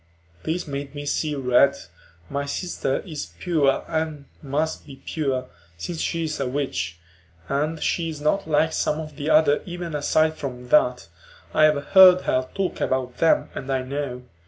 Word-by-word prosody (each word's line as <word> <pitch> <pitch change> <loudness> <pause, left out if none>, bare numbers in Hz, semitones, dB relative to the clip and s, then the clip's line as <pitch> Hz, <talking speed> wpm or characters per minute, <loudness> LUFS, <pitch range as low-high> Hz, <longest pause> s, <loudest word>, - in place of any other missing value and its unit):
This 165 +1 -2
made 140 0 -5
me 145 0 -5
see 150 +1 -1
red; 135 +1 +4 0.5
my 140 +5 -3
sister 140 -4 -2
is 155 -6 -7
pure 155 -6 +1
and 155 -3 -2 0.2
must 150 +3 -2
be 140 - -10
pure, 135 -5 -1 0.3
since 160 - -4
she 165 -1 -1
is 155 -1 -3
a 135 - -1
witch. 95 - -2 0.5
And 155 - -1
she 165 -2 0
is 155 -2 -6
not 155 +4 0
like 160 +1 +2
some 150 - 0
of 155 -2 -7
the 145 +1 -3
others 155 -1 +4
even 175 -2 -5
aside 155 +2 +2
from 125 -2 -6
that. 125 - +3 0.5
I 155 - +6
have 150 -2 +2
heard 185 -1 +8
her 130 0 0
talk 195 -2 -2
about 130 -1 -1
them 165 - +3
and 135 0 -5
I 130 -1 0
know. 130 -2 -4
145 Hz, 170 wpm, -24 LUFS, 135-160 Hz, 0.5 s, heard